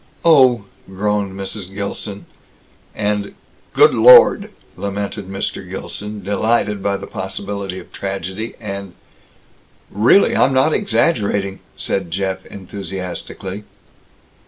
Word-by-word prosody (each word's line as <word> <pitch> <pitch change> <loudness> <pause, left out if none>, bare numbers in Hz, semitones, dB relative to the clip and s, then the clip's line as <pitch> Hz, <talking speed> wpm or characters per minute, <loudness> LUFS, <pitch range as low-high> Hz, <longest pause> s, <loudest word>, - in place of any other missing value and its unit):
"Oh!" 130 -9 +5 0.2
groaned 100 0 -1
Mrs. 95 -1 -5
Gilson; 100 0 -5 0.7
and 105 -1 -2 0.4
"Good 440 +1 +5
Lord!" 475 - +7 0.3
lamented 100 0 -4
Mr. 95 -1 -4
Gilson, 105 +2 -6
delighted 105 +1 0
by 100 0 0
the - - -8
possibility 100 -1 -5
of - - -11
tragedy; 100 +3 -5
and 100 -3 -6 1.0
"Really, 110 - +4
I'm 135 - +3
not 135 +4 +3
exaggerating," 100 - 0 0.2
said 95 -3 -2
Jeff 95 +2 -2
enthusiastically. 95 0 -6
100 Hz, 100 wpm, -19 LUFS, 95-105 Hz, 1.0 s, Lord